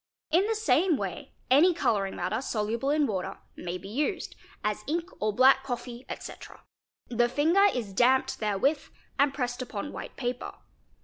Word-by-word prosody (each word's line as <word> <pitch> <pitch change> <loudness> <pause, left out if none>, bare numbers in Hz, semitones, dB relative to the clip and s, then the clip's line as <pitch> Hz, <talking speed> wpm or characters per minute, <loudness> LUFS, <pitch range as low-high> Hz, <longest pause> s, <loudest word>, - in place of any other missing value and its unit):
In 360 +6 +4
the 450 - 0
same 375 -6 +3
way 190 -6 -5 0.2
any 330 +7 +6
colouring 200 - 0
matter, 220 +6 -2
soluble 230 +1 -1
7 300 +1 +2
in - - +2
water, 190 -5 -3 0.2
may 175 0 -4
be 185 +2 -11
used, 290 - -2 0.3
as 210 0 -1
ink 335 +4 -2
or 215 0 +1
black 260 +5 +6
coffee, 245 -1 -6
etc.,—the 240 0 -5
finger 325 +10 +4
is 220 -6 -4
damped 255 +6 +3
therewith 220 +8 +1 0.3
and 280 0 +4
pressed 250 -2 -3
upon 250 +2 -5
white - - -7
paper. 245 -1 -3
250 Hz, 160 wpm, -28 LUFS, 215-295 Hz, 0.3 s, any